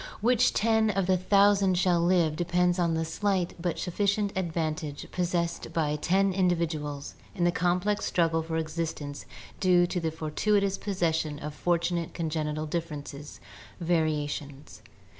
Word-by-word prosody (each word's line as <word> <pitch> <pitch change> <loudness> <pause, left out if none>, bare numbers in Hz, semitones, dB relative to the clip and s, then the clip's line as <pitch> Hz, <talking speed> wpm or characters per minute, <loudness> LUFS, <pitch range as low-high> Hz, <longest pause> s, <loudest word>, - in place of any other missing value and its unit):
Which 245 +2 +3
ten 220 0 +2
of 195 -2 0
the 185 0 +3
thousand 195 0 +4
shall 175 -2 +3
live 170 -3 +2
depends 175 +2 +1
on 170 -2 +1
the 160 0 -1
slight 190 +1 -1
but 175 -1 -1
suffi 185 +3 -2
cient 200 0 +1
advantage 160 -4 -3
possessed 175 -1 -2
by 150 -2 0
ten 190 +5 +2
individuals 165 -6 -1 0.2
in 180 - -1
the 175 - +4
complex 180 +4 0
struggle 165 -2 +1
for 160 0 -3
existence 155 -3 -4 0.3
due 180 -2 +4
to 180 +1 -2
the 165 -1 -1
fortuitous 195 +6 0
possession 165 -6 -1
of 150 +1 -6
fortunate 170 +1 -1
congenital 155 -2 -2
differences 150 -3 -6 0.4
(variations). 150 -4 -2
170 Hz, 140 wpm, -28 LUFS, 155-185 Hz, 0.4 s, thousand